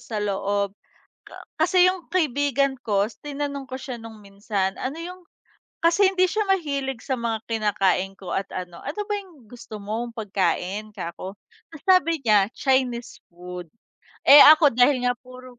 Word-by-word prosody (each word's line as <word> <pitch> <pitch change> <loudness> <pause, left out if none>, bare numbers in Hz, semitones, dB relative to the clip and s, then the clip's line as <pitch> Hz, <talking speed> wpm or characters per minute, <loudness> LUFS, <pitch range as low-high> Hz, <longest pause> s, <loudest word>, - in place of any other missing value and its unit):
sa 230 -3 -7
loob. 200 0 -1 0.6
Ka - - -12 0.2
kasi 365 -1 +5
yung 365 -2 -2
kaibigan 285 -5 +1
ko 200 -2 +1
is 220 - -14
tinanong 285 -1 -4
ko 260 - -5
siya 255 -2 -6
nung 225 -1 -11
minsan, 195 -1 -3
ano 270 +5 -4
yung 360 +2 -8 0.6
kasi 345 +4 +4
hindi 370 -1 +3
siya 430 +3 -1
mahilig 280 -9 -1
sa 265 - -1
mga 230 -1 -2
kinakain 195 -4 0
ko 185 - -8
at 195 - -2
ano, 180 -2 -7
ano 420 - -5
ba 415 - -2
yung 330 - -17
gusto 225 -2 -10
mong 225 +4 -4
pagkain 205 -1 -2
kako, 185 +2 -7 0.4
ta's 320 -3 -13
sabi 335 -4 +4
niya, 210 -3 +4
Chinese 255 -3 -1
food. 180 -1 -9 0.6
Eh, 290 - +10
ako 310 -1 +8
dahil 250 +1 +4
nga 245 - +2
puro 255 -1 -14
245 Hz, 160 wpm, -24 LUFS, 200-290 Hz, 0.6 s, Eh